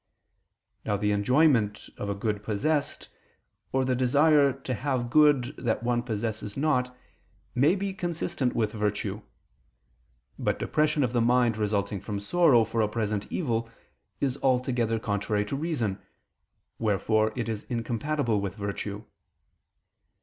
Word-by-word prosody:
Now 105 - 0
the 105 +1 0
enjoyment 115 0 +2
of 100 - -5
a 100 - -1
good 105 0 -2
possessed, 140 +9 -1 0.6
or 130 0 +1
the 130 - +1
desire 140 +3 +4
to 130 - -5
have 125 -1 -2
good 145 -3 +4
that 115 -2 -1
one 120 0 +1
possesses 110 -2 -4
not, 125 -4 0 0.6
may 145 +9 +4
be 195 0 -3
consistent 170 -8 -2
with 110 -2 +1
virtue: 105 -1 -2 1.2
but - - 0
depression 150 -1 +1
of 125 -1 -1
the 120 - +2
mind 120 -1 +3
resulting 100 -2 -1
from 105 -2 -4
sorrow 135 +1 +4
for 110 +1 -1
a 105 - +2
present 105 -2 -3
evil, 115 -8 -1 0.5
is 135 -1 -1
altogether 125 -3 +1
contrary 105 -1 -1
to 105 - -3
reason: 135 - -2 0.8
wherefore 110 0 +1
it 120 -2 -2
is 110 -2 -4
incompatible 120 0 -1
with 100 -2 -4
virtue. 100 0 -4
115 Hz, 135 wpm, -27 LUFS, 105-135 Hz, 1.2 s, desire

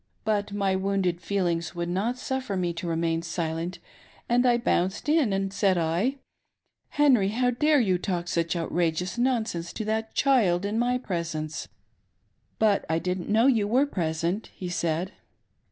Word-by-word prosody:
But 210 -1 0
my 200 -2 0
wounded 190 -2 0
feelings 175 -4 -1
would 170 0 -2
not 205 +8 -1
suffer 260 -6 -3
me 175 -2 -1
to 170 +1 -5
remain 165 0 0
silent, 165 +1 -3 0.5
and 245 +1 +3
I 240 -1 +4
bounced 190 -2 0
in, 300 -7 +3
and, 195 0 -1
said 195 -2 +2
I, 170 +11 +1 0.4
— - - -52
Henry, 255 -9 +5
how 245 +4 +1
dare 300 +4 +3
you 190 -7 +2
talk 175 -2 -2
such 170 0 0
outrageous 170 +4 -1
nonsense 225 -9 0
to 220 - -4
that 220 +1 -2
child 205 -10 +3
in 210 +3 -1
my 245 +1 +2
presence? 165 -8 -4 0.3
" - - -46
' - - -44
But 215 -2 +3
I 160 - +2
didn't 180 +1 -3
know 220 +3 +4
you 225 -7 +3
were 255 +6 +3
present,' 170 - -2
he 180 - -5
said. 170 +1 -1
195 Hz, 170 wpm, -26 LUFS, 170-230 Hz, 0.5 s, Henry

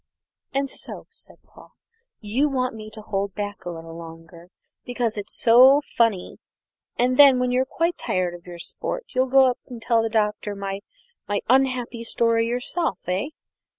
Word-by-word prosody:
"And 275 +1 0
so," - - -5
said 460 - -12
Paul, - - -18 0.5
"you 240 +8 +1
want 255 -3 -1 0.2
to 215 - -9
hold 200 -2 -3
me - - -10
back 205 -1 -7
a - - -3
little 165 -1 -8
longer 165 +1 -12 0.3
because 245 -2 -2
it's 205 -1 -6
so 255 +4 +7 0.2
funny; 225 -6 +1 0.6
and 250 +1 +2
then, 280 -3 +8
when 250 0 0
you're 255 +1 +2
quite 335 +6 -1
tired 180 -1 -1
of 175 +1 -12
your 175 -1 -8
sport, - - -5
you'll 255 +1 +2
go 265 +1 +6
up 245 - -8
and 245 -3 -8
tell 230 0 +2
the 225 - -1
Doctor 210 -2 -1
my 195 0 -4 0.5
my 205 0 -1
unhappy 255 -2 +1
story 230 0 +1
yourself, 250 +8 -1
eh? 185 +8 -1
230 Hz, 170 wpm, -23 LUFS, 200-255 Hz, 0.6 s, then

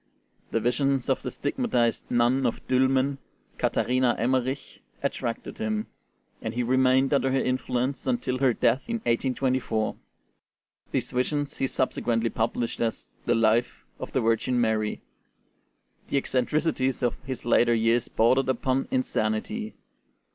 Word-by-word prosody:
The 115 - 0
visions 135 +3 0
of 135 - +1
the 125 - -4
stigmatized 140 - -1
nun 120 +3 +3
of 115 - -4
Dülmen, 130 +1 +2 0.4
Katharina 125 -1 +2
Emmerich, 130 +3 -1 0.2
attracted 125 - -3
him, 215 -1 -1 0.6
and 110 +1 -4
he 125 - 0
remained 130 +2 +3
under 135 -1 +2
her 135 - +2
influence 130 +1 -1
until 125 0 0
her 130 -2 +4
death 120 +2 +2
in 235 - -1
1824. 130 - 0 1.0
These - - -1
visions 140 +3 -1
he 135 - 0
subsequently 115 -3 0
published 115 +1 -2
as 115 -1 -2 0.2
the - - +3
'Life 115 +1 +1
of - - -6
the - - +1
Virgin 115 +2 +1
Mary.' 110 -2 0 1.1
The - - +1
eccentricities 135 0 0
of 120 - -1
his 130 -2 -6
later 120 0 +4
years 115 +1 +2
bordered 130 +4 +2
upon 130 +1 0
insanity. 215 - -1
130 Hz, 130 wpm, -26 LUFS, 120-135 Hz, 1.1 s, her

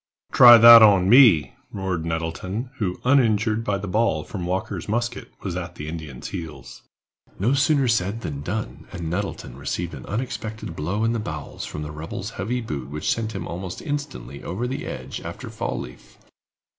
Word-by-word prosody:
"Try 120 -1 +10
that 115 0 +10
on 100 -4 +6
me," 115 - +6 0.2
roared 95 -5 -3
Nettleton, 85 +9 -4
who, 95 -4 -2
uninjured 115 -4 +3
by 100 -3 0
the 100 +1 -6
ball 100 -6 +1
from 90 0 -6
Walker's 95 0 -3
musket, 120 +2 -2
was 95 -4 -3
at 85 -1 -5
the 75 - -7
Indian's 80 -5 -7
heels. 80 -2 -8 0.6
No 115 +8 +1
sooner 140 -1 +2
said 115 -1 0
than 70 -9 -5
done, 80 - -5
and 85 -3 -5
Nettleton 95 -8 -4
received - - -4
an - - -9
unexpected 110 -4 -5
blow 90 +9 -2
in 115 +1 +1
the 115 - -1
bowels 75 -9 -6
from 75 - -6
the 75 - -6
rebel's 75 +2 -6
heavy 120 +7 -3
boot 70 - -5
which 75 +2 -2
sent 110 -1 -4
him 95 -3 -5
almost 90 +1 -6
instantly 145 - -5
over 100 +8 -3
the 130 +2 -4
ledge 65 +1 -6
after - - -8
Fall - - -3
leaf. 65 - -11
95 Hz, 175 wpm, -23 LUFS, 80-115 Hz, 0.6 s, Try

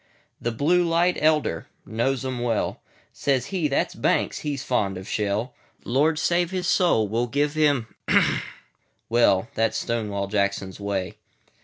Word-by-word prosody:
The 120 - -1
"Blue 165 +10 +2
light 170 +1 +2
Elder" 150 - +1 0.2
knows 125 +4 -1
'em 130 -2 -3
well:Says 120 +2 -2
he, 185 -6 -1
"That 140 - 0
's - - -11
Banks; - - 0
he 145 -2 -3
's 135 - -5
fond 100 -8 0
of 95 +2 -8
shell. 105 +3 -1 0.3
Lord 150 +6 +2
save 170 +2 +1
his 185 -1 -3
soul! 175 - +3
we 105 - -6
'll 120 - 0
give 145 +4 0
him 145 -6 +2 0.6
——;" - - -22
Well, 115 -3 +3
That 115 -2 +1
's - - +1
Stonewall 105 -4 -2
Jackson's 100 -1 -1
Way. 100 -2 -3
120 Hz, 160 wpm, -24 LUFS, 105-150 Hz, 0.6 s, soul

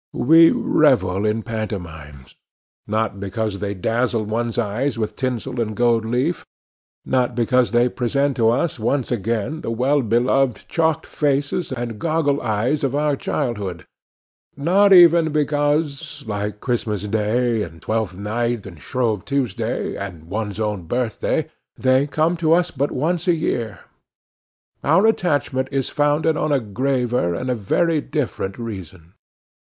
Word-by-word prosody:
We 165 +4 +7
revel 95 +3 +2
in 110 +1 -1
pantomimes—not 100 - -6
because 100 +1 -3
they 100 0 -3
dazzle 115 +4 0
one's 115 +2 -2
eyes 120 +4 -1
with 110 -2 -3
tinsel 125 -1 -2
and 110 -2 -3
gold 120 -2 +2
leaf; 120 +3 -1 0.6
not 125 -2 0
because 125 +1 +2
they 120 +1 +3
present 135 +3 0
to 115 -2 +4
us, 125 +4 0
once 125 +4 -1
again, 115 - -2
the - - -4
well 130 +5 +1
beloved 125 +2 +1
chalked 160 -1 0
faces, 145 +3 -1
and 120 -4 -4
goggle 155 -3 0
eyes 120 +6 0
of 135 0 0
our 150 0 +1
childhood; 100 -10 -3 0.7
not 190 +8 +3
even 170 -3 +7
because, 145 0 -1
like 105 -1 -4
Christmas 110 -5 -2
day, 110 +2 0
and 80 -4 -6
Twelfth 110 -4 -2
night, 115 +2 -2
and 85 -6 -11
Shrove 115 - -1
Tuesday, 125 -4 -2
and 95 -5 -7
one's 105 +4 -4
own 105 -5 -2
birthday, 120 0 -1 0.3
they 130 +2 +3
come 160 +4 +1
to 165 -1 +3
us 175 +1 +2
but 140 +1 -1
once 170 +6 -1
a 175 - +4
year;—our 125 - -3
attachment 145 -10 +1
is 135 -2 -1
founded 150 +2 +1
on 150 0 -1
a 140 - +3
graver 125 -4 -1
and 125 +6 -2
a - - +2
very 155 - +1
different 125 -11 -3
reason. 95 -7 -8
120 Hz, 135 wpm, -21 LUFS, 105-145 Hz, 0.7 s, We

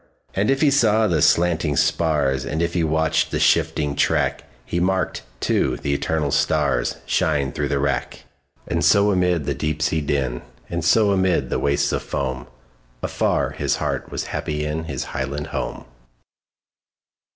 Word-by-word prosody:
And 100 +2 0
if 135 0 +2
he 150 -3 +4
saw 110 -5 +3
the 85 -7 +1
slanting 85 -3 +2
spars, 70 -5 +1
And 80 +4 -2
if 85 0 -1
he 85 - +1
watched 80 0 +1
the - - -2
shifting 75 -2 +2
track, - - +1 0.2
He 85 - -2
marked, 95 +1 0 0.2
too, - - +1
the 70 - -2
eternal 75 0 -1
starsShine 70 +4 0
through 75 - -1
the 70 0 0
wrack. 70 -3 -2 0.4
And - - -1
so 100 +1 +5
amid 90 -5 +1
the 70 - 0
deep 75 +3 -2
sea 80 -1 0
din, 65 -4 -1 0.3
And 85 -1 -2
so 100 +4 +4
amid 95 -9 +1
the - - 0
wastes 70 0 +1
of - - -1
foam, 65 -2 -4 0.6
Afar - - 0
his - - -1
heart - - -3
was - - -3
happy 75 0 -2
inHis 75 -3 -3
highland 70 +3 -4
home! - - -4
80 Hz, 155 wpm, -22 LUFS, 70-90 Hz, 0.6 s, so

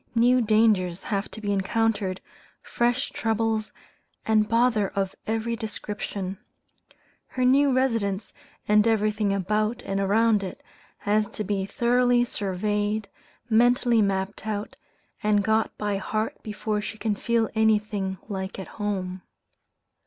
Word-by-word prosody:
New 245 +2 +4
dangers 210 -5 +2
have 200 -1 -2
to - - -8
be 205 -2 -2
encountered, 200 -1 0 0.4
fresh 240 +2 0
troubles, 220 -1 -1 0.5
and 215 -1 +3
bother 230 -3 +3
of 195 -1 -1
every 225 +1 -1
description. 205 -3 -5 0.9
Her 255 -1 -1
new 275 +2 +5
residence, 230 -6 0 0.3
and 210 +1 +4
everything 215 -2 +1
about 210 +4 0
and 195 0 -2
around 210 +2 +3
it, 190 - -7 0.4
has 210 +1 +2
to 215 - -5
be 195 -1 -2
thoroughly 245 +3 +3
surveyed, 205 0 -2 0.4
mentally 240 0 +4
mapped 195 +1 -1
out, 210 -1 -3 0.5
and 210 -1 +2
got 220 +1 +1
by 205 -1 -1
heart 215 +3 -3
before 210 0 -3
she 215 - -6
can 220 -1 0
feel 230 +2 +1
anything 210 -3 +1
like 190 -2 -4
at 190 - -6
home. 190 -3 -2
215 Hz, 125 wpm, -25 LUFS, 200-225 Hz, 0.9 s, new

